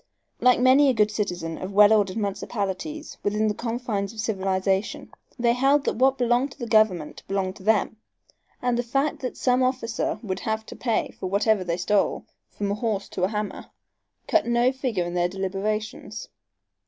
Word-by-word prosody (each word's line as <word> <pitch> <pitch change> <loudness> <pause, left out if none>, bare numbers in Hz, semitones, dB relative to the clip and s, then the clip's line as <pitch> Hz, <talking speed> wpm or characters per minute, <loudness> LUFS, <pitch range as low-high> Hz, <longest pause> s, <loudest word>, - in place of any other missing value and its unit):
Like 250 -1 +4
many 265 +3 +6
a 260 - +2
good 210 -1 +3
citizen 180 -6 -3
of 190 +2 -6
well 205 +1 +7
ordered 205 -2 +2
municipalities 205 +8 -4
within 210 +1 0
the 210 - +1
confines 225 -4 -3
of 225 - -12
civilization, 195 -2 -1 0.3
they 235 -1 +3
held 275 +3 +3
that - - -1
what 265 +2 +3
belonged 245 +3 +1
to - - -24
the 245 - -5
government 215 -8 +2
belonged 195 -1 -2
to 190 - -14
them, 220 +1 +2 0.7
and 245 -1 +1
the - - +3
fact 275 +5 -1
that 255 - -5
some 250 0 +2
officer 255 -3 -1
would 190 -3 -3
have 220 -1 -2
to - - -9
pay 230 -3 -1
for - - -3
whatsoever 205 +1 +2
they 170 -1 -2
stole, 195 +3 +1 0.2
from 200 -1 -3
a - - +1
horse 210 -2 -2
to 180 - -1
a - - +1
hammer, 210 0 -4 0.6
cut 325 -5 +2
no 240 +1 +3
figure 250 -9 -2
in 175 - -5
their 175 0 +1
deliberations. 205 +3 -4
215 Hz, 180 wpm, -25 LUFS, 195-245 Hz, 0.7 s, well